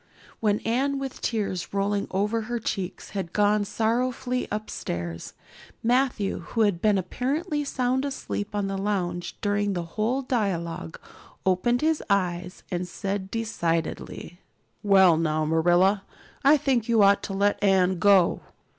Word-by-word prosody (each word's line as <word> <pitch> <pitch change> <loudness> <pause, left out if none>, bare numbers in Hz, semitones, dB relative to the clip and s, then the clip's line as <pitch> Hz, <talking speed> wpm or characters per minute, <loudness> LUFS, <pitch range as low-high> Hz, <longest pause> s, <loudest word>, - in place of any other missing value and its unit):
When 210 -2 +1
Anne, 270 +5 0
with 270 -1 -5
tears 200 -5 -2
rolling 200 0 0
over 210 +4 0
her 240 +2 -3
cheeks, 195 -4 -4
had 190 -4 -4
gone 210 0 +3
sorrowfully 250 +4 -1
upstairs, 85 - -5 0.5
Matthew, 240 -4 +1
who 230 - -3
had 200 -5 +2
been 210 -2 +3
apparently 295 - -2
sound 260 -1 0
asleep 240 -7 -4
on 205 -1 0
the 195 0 -3
lounge 180 -4 -2
during 205 -1 0
the 175 -2 -2
whole 220 +10 -1
dialogue, 170 - -2 0.5
opened 190 +7 +2
his 315 0 +1
eyes 180 -2 -1
and 180 0 -2
said 195 +1 -4
decidedly: 175 -5 -3 0.4
"Well 190 -5 +5
now, 155 -1 0
Marilla, 175 +5 +3 0.4
I 290 +3 +6
think 250 -5 0
you 225 -3 +5
ought 200 0 +5
to 195 - -5
let 200 +1 +1
Anne 190 -2 +3
go." 195 -2 +4
205 Hz, 135 wpm, -26 LUFS, 180-235 Hz, 0.5 s, I